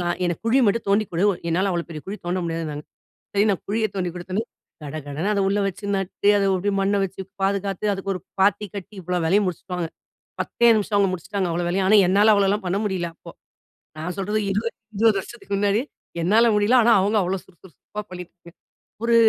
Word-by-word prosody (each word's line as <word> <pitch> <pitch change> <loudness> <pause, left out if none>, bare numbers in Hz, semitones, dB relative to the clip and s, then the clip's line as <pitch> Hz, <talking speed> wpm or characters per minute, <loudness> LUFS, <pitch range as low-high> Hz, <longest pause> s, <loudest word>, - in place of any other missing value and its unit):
நான் 175 0 -1
எனக்கு 175 +1 -2
குழி 250 +4 +4
மட்டும் 225 +3 +1
தோண்டி 205 +2 +3
கொடு 170 - 0
உ - - +1 0.2
என்னால 190 +4 +1
அவ்வளோ 170 -1 -2
பெரிய 155 -2 -7
குழி 200 +2 -4
தோண்ட 180 +1 0
முடியாதுன்னாங்க. 160 -3 -4 0.5
சரி 200 +1 +3
நான் 195 - -1
குழிய 220 +1 +1
தோண்டிக் 180 -2 -2
கொடுத்தவுடனே, 185 +5 -3 0.4
கடகடன்னு 150 +6 -3
அத 200 - +1
உள்ள 200 +1 +1
வச்சு 195 +2 -5
நட்டு 195 +1 -1
அத 200 - +2
அப்படியே 195 +2 0
மண்ண 200 +1 +2
வச்சு 190 0 -6 0.2
பாதுகாத்து 200 +1 0
அதுக்கு 195 0 -2
ஒரு 180 - -5 0.2
பாத்தி 205 +1 +3
கட்டி 200 +2 -8
இவ்ளோ 180 +1 -1
வேலையும் 200 +3 +3
முடிச்சுட்டாங்க. 180 -1 -4 0.5
10தே 235 0 +3
நிமிஷம் 210 -1 0
அவங்க 195 -1 +3
முடிச்சுட்டாங்க 185 +1 -2
அவ்ளோ 175 +1 -1
வேலையும். 190 +1 +1
ஆனா 215 - +7
என்னால 205 +3 +5
அவ்வளோல்லாம் 200 0 +1
பண்ண 190 +3 0
முடில 180 -4 -1
அப்போ. - - -12 0.7
நான் 180 +4 -4
சொல்றது 210 +3 0
20- 215 +4 -1 0.2
20 220 -2 +4
வருஷத்துக்கு 200 -2 -7
முன்னாடி, 205 +3 +2 0.4
என்னால 215 +7 +4
முடியல. 210 +5 +4
ஆனா 230 0 +6
அவங்க 210 +2 +1
அவ்ளோ 190 +2 -1
சுறு, 185 - -23
சுறு, 185 -6 -16
சுறுப்பா 210 0 -7
பண்ணிட்டு 180 -1 -9
போய் 170 +1 -15 0.5
ஒரு 235 0 +3
195 Hz, 200 wpm, -23 LUFS, 180-205 Hz, 0.7 s, ஆனா